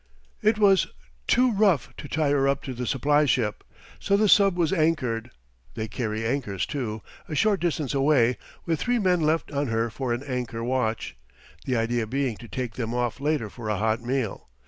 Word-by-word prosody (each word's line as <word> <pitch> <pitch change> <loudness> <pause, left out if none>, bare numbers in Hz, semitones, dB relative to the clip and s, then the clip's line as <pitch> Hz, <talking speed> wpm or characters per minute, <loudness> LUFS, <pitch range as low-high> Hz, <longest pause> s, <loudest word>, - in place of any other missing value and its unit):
It 215 +1 +3
was 200 -3 +4 0.4
too 250 0 +4
rough 195 - +2
to 145 - -7
tie 150 -1 0
her 135 -1 +3
up 140 0 0
to 130 - -5
the 125 0 -4
supply 145 +3 +2
ship, 115 -6 0 0.4
so 200 - +2
the 215 +1 +3
sub 195 -2 +5
was 170 0 +1
anchored 130 -9 0 0.5
they 110 - -3
carry 110 +1 -3
anchors 115 -6 -1
too 110 -7 -4 0.3
a 155 - -3
short 205 +5 +3
distance 155 -5 -1
away, 135 -4 +3 0.3
with 165 -2 0
three 245 0 +1
men 185 -5 +2
left 155 +1 +1
on 140 0 -1
her 115 0 0
for 125 +2 -3
an 120 +3 -2
anchor 125 -4 -4
watch, 115 - -1 0.5
the 130 - 0
idea 115 0 0
being 130 -1 -1
to 120 - -11
take 120 +2 -4
them 115 0 -3
off 125 +1 -1
later 150 -5 0
for 110 +1 -7
a 105 - 0
hot 110 +3 0
meal. 125 -3 -3
130 Hz, 190 wpm, -25 LUFS, 115-155 Hz, 0.5 s, sub